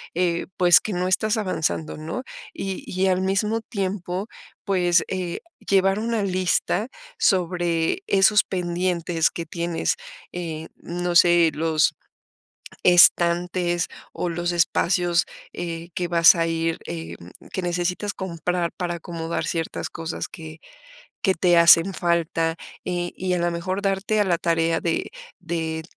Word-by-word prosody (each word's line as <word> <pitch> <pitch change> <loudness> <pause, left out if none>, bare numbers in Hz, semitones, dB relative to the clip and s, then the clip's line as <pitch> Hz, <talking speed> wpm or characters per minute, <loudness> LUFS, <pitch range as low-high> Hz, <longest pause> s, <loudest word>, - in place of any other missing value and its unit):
eh, 170 -1 0
pues, 175 -4 +6
que 210 - -5
no 180 +1 -1
estás 215 +4 +1
avanzando, 160 -6 -2
¿no? 160 +12 -5 0.3
Y 195 -1 -5
y, 185 +1 0
al 185 0 +2
mismo 210 +4 0
tiempo, 195 -3 -3 0.4
pues, 180 -4 +2
eh, 180 -2 -3 0.2
llevar 195 +1 +2
una 225 -2 -1
lista 185 +3 0 0.3
sobre 175 - +1
esos 195 +1 +4
pendientes 175 -2 0
que 170 - -5
tienes, 170 - -1 0.4
eh, 160 -2 -5
no 175 0 -4
sé, 170 -1 +6
los 155 0 +1 0.9
estantes 175 0 +4 0.2
o - - -3
los 175 +1 -2
espacios, 175 0 +2 0.3
eh, 170 -1 -5
que 180 - -1
vas 170 0 +6
a 165 0 0
ir, 165 0 -1
eh, 80 0 -6
mm, 85 +1 -15
que 185 - -2
necesitas 180 +3 -2
comprar 175 -2 -2
para 175 -2 -3
acomodar 165 -1 -4
ciertas 165 -1 -3
cosas 165 0 -5
que 160 -3 -10 0.6
que 190 -3 +3
te 175 0 +3
hacen 170 +2 +7
falta, 165 -2 0 0.3
eh, 175 -1 -3
y, 185 0 -2
a - - 0
la 175 0 +1
mejor 185 +3 -3
darte 195 +2 0
a 205 - +4
la 175 -3 +1
tarea 165 -1 +1
de 170 - -2 0.3
de 160 -2 -3
175 Hz, 140 wpm, -23 LUFS, 165-185 Hz, 0.9 s, hacen